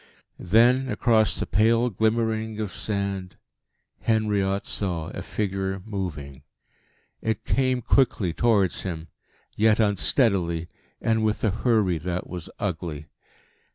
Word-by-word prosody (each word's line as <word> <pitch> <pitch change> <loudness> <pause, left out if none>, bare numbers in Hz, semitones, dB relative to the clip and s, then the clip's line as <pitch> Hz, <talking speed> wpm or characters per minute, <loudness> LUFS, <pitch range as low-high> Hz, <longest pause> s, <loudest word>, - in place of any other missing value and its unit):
Then, 120 +8 +4
across 110 -3 +2
the - - -1
pale 115 +3 +3
glimmering 110 +1 0
of 105 -3 -3
sand, 100 0 -3 0.6
Henriot 105 -3 0
saw 85 -5 -3
a - - -6
figure 95 -2 -2
moving. 80 -10 -5 0.8
It 110 -1 -2
came 130 -2 +1
quickly 105 -10 +2
towards 105 -4 +2
him, 85 -4 -5 0.5
yet 110 +1 +3
unsteadily, 95 - +2 0.3
and 110 -1 +1
with 110 -1 0
a 110 - +3
hurry 105 -6 +1
that 90 +2 -3
was 90 -3 -6
ugly. 80 -5 -4
100 Hz, 115 wpm, -25 LUFS, 90-110 Hz, 0.8 s, Then